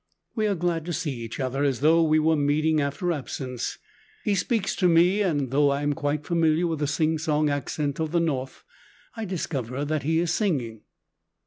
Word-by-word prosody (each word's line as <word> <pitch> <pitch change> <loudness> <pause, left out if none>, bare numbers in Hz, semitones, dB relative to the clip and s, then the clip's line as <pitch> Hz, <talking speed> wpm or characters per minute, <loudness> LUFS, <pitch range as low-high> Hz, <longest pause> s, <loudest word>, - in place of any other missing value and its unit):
We 215 -2 0
are 200 - +1
glad 170 -2 -1
to 175 - -3
see 160 -1 -2
each 115 -2 -6
other, 135 +1 -1
as 135 -3 0
though 160 +3 +5
we 155 -1 +3
were 160 +1 +3
meeting 155 +2 +2
after 140 +6 -1
absence! 130 -4 -4 0.5
He 210 - +1
speaks 200 +1 0
to 185 - +3
me, 175 +4 +4
and 145 -10 0
though 145 +1 +4
I 140 +1 -1
am 145 0 +1
quite 145 +1 -2
familiar 165 0 +2
with 165 -3 -2
the 145 - 0
singsong 155 0 +1
accent 145 +1 -2
of 160 -1 -1
the 170 - +2
North, 135 -6 -2 0.5
I 225 -1 -4
discover 140 - -3
that 155 0 -1
he 160 +4 0
is 170 0 +1
singing. 125 - -1
155 Hz, 195 wpm, -25 LUFS, 140-170 Hz, 0.5 s, though